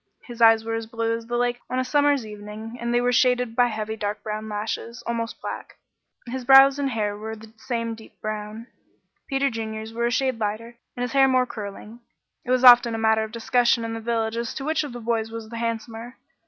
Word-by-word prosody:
His 240 -2 -10
eyes 225 -1 +6
were 225 - -2
as 225 0 -3
blue 230 0 -1
as 230 0 -8
the 240 0 -1
lake 245 0 0
on 255 - -2
a 255 - +1
summer's 285 -2 +2
evening, 210 +2 -8
and 235 0 -2
they 240 - +3
were 245 0 +1
shaded 250 -1 +2
by 245 0 +4
heavy 220 -1 -4
dark 210 -1 -4
brown 215 0 -4
lashes, 220 +3 -4
almost 230 -1 -3
black. - - -7 0.5
His 255 +1 -5
brows 270 +2 +7
and 280 -1 0
hair 210 -4 -1
were 220 +2 -6
the 220 0 -14
same 230 -2 -3
deep 220 0 -14
brown. 215 +1 -5 0.6
Peter 275 0 +1
Junior's 220 -1 -5
were 235 +1 0
a - - -1
shade 260 -1 0
lighter, 220 +3 -3 0.2
and 245 - -2
his 245 - -3
hair 270 -1 +5
more 255 -1 +3
curling. 215 0 -8 0.4
It - - -11
was 255 0 +2
often 240 -2 +8
a - - -2
matter 220 0 +2
of 220 - -6
discussion 235 0 +2
in 225 - -4
the 225 - -4
village 225 0 -1
as 235 -1 -3
to 270 - -5
which 315 +1 +1
of 290 - -6
the 240 - -7
boys 225 -1 -1
was 225 -1 -8
the 230 - -7
handsomer. 230 +1 -4
230 Hz, 225 wpm, -24 LUFS, 220-245 Hz, 0.6 s, often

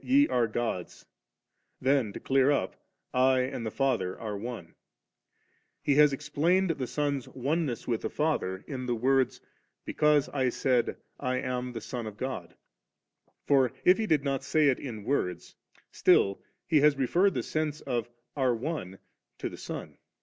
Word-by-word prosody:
Ye 280 +3 +4
are 120 -2 +2
gods 110 -6 -4 0.2
;" - - -57
' - - -48
then 135 -7 +3
to - - -6
clear 135 0 +3
up 140 -10 0 0.2
* - - -53
1 130 +1 +4
and 130 -2 -3
the 110 - -2
Father 110 -8 -1
are 110 -2 -4
One,' 105 -5 -7 1.1
He 145 - +3
has 150 +1 +6
explained 160 +6 +1
the 135 -5 -3
Son's 145 -2 -1
oneness 140 -1 -2
with 115 -2 0
the - - -2
Father 120 -12 -1
in 130 -3 -5
the 120 - +1
words, 130 +3 +1 0.2
* - - -48
Because 150 -2 +3
I 130 -3 +1
said, 125 -1 +1 0.2
I 130 -2 -1
am 125 0 -3
the 115 - -5
Son 120 +1 -5
of 105 -1 -8
God' 130 -10 -5 0.9
Forif 140 +6 +4
He 220 - 0
did 150 -6 +2
not 135 -2 -1
say 145 +2 +3
it 130 - +1
in 115 -7 -6
words, 90 -9 -2 0.4
still 100 0 +3 0.3
He 155 - +4
has 150 -1 +5
referred 175 +9 +2
the 125 - -1
sense 155 +1 -2
of 120 -3 -2 0.3
'are 130 -4 +2
One' 115 - -4 0.4
to - - -3
the - - -9
Son. - - -7
130 Hz, 170 wpm, -29 LUFS, 120-145 Hz, 1.1 s, has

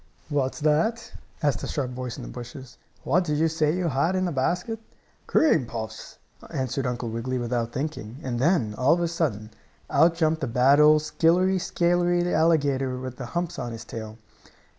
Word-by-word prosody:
"What's 140 -2 -1
that?" 165 +10 +1 0.3
asked 145 -2 +1
a - - -4
sharp 130 -4 -2
voice 125 -1 -5
in - - -7
the - - -7
bushes. 125 +1 -10 0.2
"What 180 +6 +2
did 150 -3 -1
you 160 +2 +3
say 155 -1 +1
you 180 -1 -1
had 145 +7 +1
in 185 0 +1
the 175 - -1
basket?" 180 - -1 0.5
"Cream 160 - +3
puffs," 110 -1 -7 0.3
answered 130 0 -2
Uncle 120 -1 -3
Wiggily, 115 +3 -3
without 120 -1 -2
thinking, 130 -5 -5
and 120 -2 -3
then, 130 - +2
all 130 +7 +4
of 175 - 0
a 170 - +1
sudden, 135 - -2 0.4
out 165 +4 +4
jumped 160 -1 +1
the 135 - -1
bad 125 +5 +4
old 150 0 +6
skillery 180 +4 +2
scalery 175 0 +1
alligator 140 -5 +2
with 130 -1 -6
the 125 - -6
humps 175 0 -2
on 120 -2 -4
his 115 - -8
tail. 110 -1 -7
140 Hz, 185 wpm, -25 LUFS, 125-170 Hz, 0.5 s, old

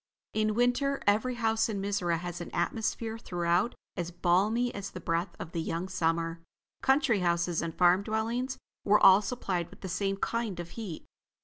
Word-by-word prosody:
In 215 -1 +1
winter, 245 +4 +2
every 220 +5 +2
house 225 -1 +1
in 205 -2 -2
Mizora 195 -4 0
had 175 0 -5
an 175 - -6
atmosphere 225 +4 -1
throughout 175 +3 0 0.2
as 175 -2 -3
balmy 195 +8 +2
as 200 -1 -5
the 185 - -8
breath 170 +2 -1
of 160 - -7
the 170 - -2
young 165 +3 -3
summer. 165 -2 -1 0.4
Country 265 -5 +3
houses 170 -1 +1
and 165 -1 -4
farm 180 +1 +5
dwellings 230 +5 -2 0.3
were 210 +1 +5
all 195 +1 +8
supplied 195 -5 -2
with - - -16
the 190 - -5
same 195 +2 -1
kind 225 -3 -2
of 175 0 -5
heat. 205 -8 -7
195 Hz, 175 wpm, -30 LUFS, 175-225 Hz, 0.4 s, all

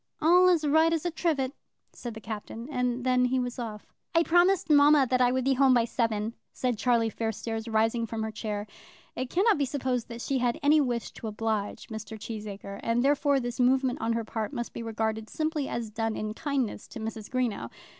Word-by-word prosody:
"All 355 +3 +6
as 335 -4 +3
right 315 +3 +4
as 330 0 -1
a 350 - 0
trivet," 295 -6 0 0.4
said 240 -3 -7
the - - -7
Captain; 220 +2 -7
and 250 -2 -1
then 255 -1 +3
he 255 +1 +1
was 245 0 -3
off. 215 -3 -7 0.2
"I 330 - +5
promised 350 +3 +3
mamma 295 -2 +6
that 255 0 +2
I 245 0 +4
would 260 0 0
be 270 - +4
home 265 -1 +5
by 235 -1 +3
seven," 225 -2 -1 0.2
said 250 -2 -1
Charlie 235 -3 +2
Fairstairs, 225 +1 -3
rising 225 +1 +1
from 220 0 -3
her 220 - -3
chair. 210 -1 -4 0.5
It 255 0 -3
cannot 395 - +3
be 280 - +2
supposed 255 -3 -2
that 235 0 -7
she 270 -2 0
had 240 -1 0
any 300 +1 +5
wish 240 -4 -2
to 225 - -8
oblige 215 0 -3
Mr. 220 0 -7
Cheesacre, 205 -2 -7
and 235 +1 +1
therefore 285 0 +3
this 245 -1 -5
movement 255 0 +2
on 230 - +1
her 230 0 -1
part 220 -1 -4
must 240 - -4
be - - -5
regarded 220 -1 -2
simply 310 -3 -2
as 230 -2 -4
done 225 0 -2
in 215 0 -3
kindness 265 -5 -2
to - - -9
Mrs. 220 -1 -6
Greenow. 250 -4 -1
245 Hz, 205 wpm, -28 LUFS, 220-275 Hz, 0.5 s, All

